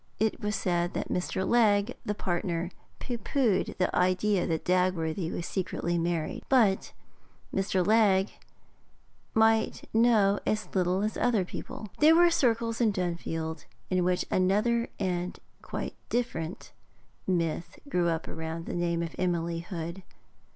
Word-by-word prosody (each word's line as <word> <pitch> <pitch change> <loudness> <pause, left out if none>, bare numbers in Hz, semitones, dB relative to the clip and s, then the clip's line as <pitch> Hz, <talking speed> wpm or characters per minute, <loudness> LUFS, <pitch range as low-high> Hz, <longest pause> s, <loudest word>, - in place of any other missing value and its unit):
It 220 +1 0
was 210 0 -1
said 175 -3 0
that - - -3
Mr. 185 +1 -1
Legge, 215 -1 +3
the 210 - -2
partner, 175 -2 -2 0.3
pooh 240 -2 -4
poohed 220 -4 0
the 185 - 0
idea 185 +1 +2
that 160 -2 -2
Dagworthy 180 -2 +1
was 170 - -4
secretly 175 -3 -2
married. 165 -2 -1
But 220 -8 +3 0.6
Mr. 190 -2 +1
Legge 205 -2 +3 1.0
might 220 0 +3
know 220 -3 +4
as 215 0 -2
little 185 +1 +1
as 215 - -1
other 225 -6 +2
people. 215 - -7
There 310 +2 +7
were 345 0 +6
circles 230 -6 +1
in 225 -3 +4
Dunfield 170 -3 -3 0.3
in 185 -1 +2
which 180 0 +1
another 210 +6 +2
and 180 -2 -2 0.2
quite - - -4
a - - -38
different 230 -6 -3 0.6
myth 170 -2 -1
grew 180 -10 +1
up 165 -1 -2
around 160 +1 -5
the - - -5
name 170 -1 0
of 165 - -5
Emily 170 -2 0
Hood. 170 +1 -6
185 Hz, 140 wpm, -29 LUFS, 175-215 Hz, 1.0 s, There